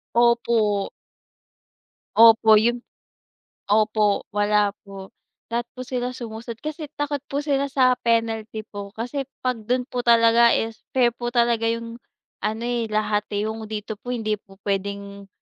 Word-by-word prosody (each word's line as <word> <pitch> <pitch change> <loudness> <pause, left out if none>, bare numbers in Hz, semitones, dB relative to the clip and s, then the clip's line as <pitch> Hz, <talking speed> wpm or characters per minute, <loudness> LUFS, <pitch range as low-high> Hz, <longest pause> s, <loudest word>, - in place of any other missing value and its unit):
Opo. 235 -4 +2 1.3
Opo 225 -1 +7
yung 235 +3 +3 0.9
opo, 210 0 +2
wala 205 0 +2 0.2
po. 195 -1 -10 0.4
Lahat 235 0 -1
po 255 - -6
sila 250 0 -3
sumusunod 230 0 -7
kasi 305 0 -5
takot 290 -1 -2
po 285 +1 -2
sila 280 -1 0
sa 260 -2 +3
penalty 225 -2 -1
po. 205 -1 -8
Kasi 255 +4 -4 0.2
'pag 250 -3 0
dun 250 0 +1
po 250 - -4
talaga 235 0 +5
is 225 -1 -3 0.2
fair 240 -2 +4
po 240 0 -5
talaga 235 -1 +2
yung 230 +1 -4 0.4
ano, 220 +2 -2
eh, 240 -2 -1
lahat, 210 -1 0
eh. 205 - 0
Yung 220 0 -5
dito 215 -1 -6
po - - -13
hindi 215 -2 -2
po 195 -2 -19
puwedeng, 200 0 -4
230 Hz, 145 wpm, -23 LUFS, 210-240 Hz, 1.3 s, Opo